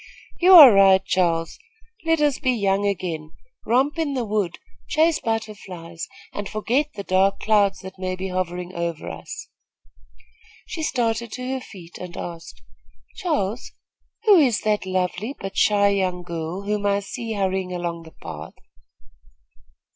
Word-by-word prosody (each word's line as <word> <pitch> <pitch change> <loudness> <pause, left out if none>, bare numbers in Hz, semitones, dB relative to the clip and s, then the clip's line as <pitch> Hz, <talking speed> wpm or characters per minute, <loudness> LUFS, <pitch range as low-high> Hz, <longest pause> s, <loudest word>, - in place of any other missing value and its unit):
"You 365 +2 +6
are 290 - +12
right, 195 -1 +6
Charles; 165 -3 0 0.5
let 325 -1 +2
us 290 -3 +2
be 260 -3 +1
young 200 -2 +1
again, 165 -5 -3 0.3
romp 270 +7 +2
in 290 -4 -1
the 250 -3 -1
wood, 205 -5 -1 0.3
chase 320 0 +2
butterflies 190 -7 -5 0.3
and 205 -1 -5
forget 245 +7 0
the 200 - -5
dark 195 +1 +2
clouds 205 -3 +2
that 190 0 -10
may 185 0 -2
be 190 +1 -5
hovering 180 0 -3
over 170 -2 -4
us." - - -7 1.2
She 325 - -6
started 235 -6 -1
to 250 0 -5
her 265 -1 -3
feet 175 -7 -12
and 180 -1 -8
asked: 165 -1 -8 0.5
"Charles, 250 - -2 0.5
who 420 -4 +7
is 250 -8 +3
that 210 -3 0
lovely, 185 +7 -2
but 195 0 -6
shy 200 -1 +4
young 185 -3 -1
girl, 170 +2 -5
whom 205 0 -1
I 200 0 +1
see 225 +3 -5
hurrying 190 -2 -1
along 175 -1 -3
the 160 -1 -15
path?" 80 -1 -8
195 Hz, 145 wpm, -23 LUFS, 180-230 Hz, 1.2 s, are